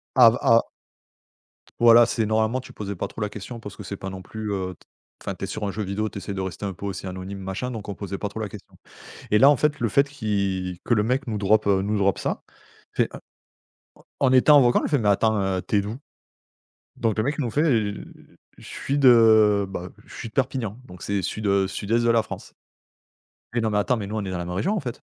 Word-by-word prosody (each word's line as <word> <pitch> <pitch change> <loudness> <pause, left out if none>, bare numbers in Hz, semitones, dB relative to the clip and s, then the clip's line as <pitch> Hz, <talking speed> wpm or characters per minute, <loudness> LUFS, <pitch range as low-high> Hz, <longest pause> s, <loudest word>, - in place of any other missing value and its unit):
A 125 -3 +8 0.2
Ah 115 0 +5 1.2
voilà, 120 0 +8
c'est 115 -1 -1
normalement, 110 +3 +1
tu 130 - -13
posais 100 -2 -6
pas - - -3
trop - - -10
la 105 - 0
question 105 +3 -8
parce 105 -3 -9
que 105 - -9
c'est 100 +1 -5
pas 95 - -6
non 95 0 -7
plus, 110 +3 -6
heu, 95 -2 -3
t - - -26 0.4
enfin, - - -4
tu - - -5
es - - -2
sur 105 - -5
un 100 - -1
jeu 105 +2 -4
vidéo, 100 +3 -2
tu 105 - -8
essaies 100 0 -5
de 95 - -4
rester 95 +1 -5
un 100 - -3
peu 100 +3 -7
aussi 100 -1 -5
anonyme, 95 +1 -6
machin, 95 +6 -4
donc 110 -5 -7
on 100 - -3
posait 100 0 -6
pas 105 - -3
trop 100 +2 -7
la 110 - -3
question 100 0 -13 0.6
et 105 - +6
là, 135 +6 +8
en 145 - +4
fait, 150 +2 0
le 115 - +1
fait 140 +6 +3
qui 100 -8 -2
que 120 - +2
le 105 - +2
mec 130 +5 0
nous 110 -3 -3
drop 105 +2 +2
nous 100 +1 +1
drop 100 -1 +2
ça, - - -3 0.3
on - - -30
fait, - - +2 1.1
en 135 - +3
en - - +3
étant 145 +3 +7
en - - +7
vocal: 120 -1 +3
«En - - 0
fait, 145 - +1
mais 105 -3 +1
attends, 110 +2 +3
heu, 95 -1 -1
tu 105 - +2
es - - +3
d'où?» 105 +4 -5 1.0
donc 115 -2 0
le 110 - +2
mec 145 +4 -2
nous 125 -5 -1
fait: 145 +7 0
«Heu, 110 -9 0 0.5
je - - -15
suis 140 +2 -2
de 110 -5 +6
bah, 90 -1 -6 0.2
je - - -15
suis 115 - -6
de - - -27
Perpignan», 125 -5 -2
donc 90 -7 -13
c'est 100 -2 -2
sud, 110 +4 -3
heu, 100 -1 +2
sud-est 110 +4 -1
de 120 - +2
la 115 -1 +4
France: - - -9 1.0
«Non, 115 -2 +1
mais 105 - -1
attends, 125 +4 +1
mais 105 - -4
nous, 105 +2 -5
on 105 - -2
est 95 - -4
dans 90 - -3
la 85 - -4
même 90 - -4
région, 185 - 0
en 210 - -1
fait». 120 -4 -6
105 Hz, 255 wpm, -24 LUFS, 100-120 Hz, 1.2 s, A